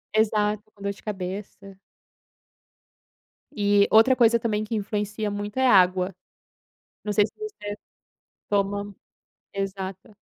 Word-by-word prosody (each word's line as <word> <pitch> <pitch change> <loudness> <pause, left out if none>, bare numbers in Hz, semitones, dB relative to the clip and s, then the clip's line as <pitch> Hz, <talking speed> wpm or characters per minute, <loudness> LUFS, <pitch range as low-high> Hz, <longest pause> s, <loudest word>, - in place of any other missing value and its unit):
Exato, 210 -1 +2
com 200 - -19
dor 200 0 -1
de 200 - -18
cabeça. 195 0 -6 1.8
E 205 -1 +3
outra 225 +4 +6
coisa 235 -2 +4
também 215 -2 -1
que 215 +1 -3
influencia 210 0 -2
muito 205 +2 -5
é 260 0 +4
água. 185 -3 +4 0.9
Não 210 - -1
sei 205 -1 +4
se - - -17
você 420 - -6 0.8
toma, 200 0 -1 0.6
exato. 195 0 -5
205 Hz, 115 wpm, -25 LUFS, 195-215 Hz, 1.8 s, outra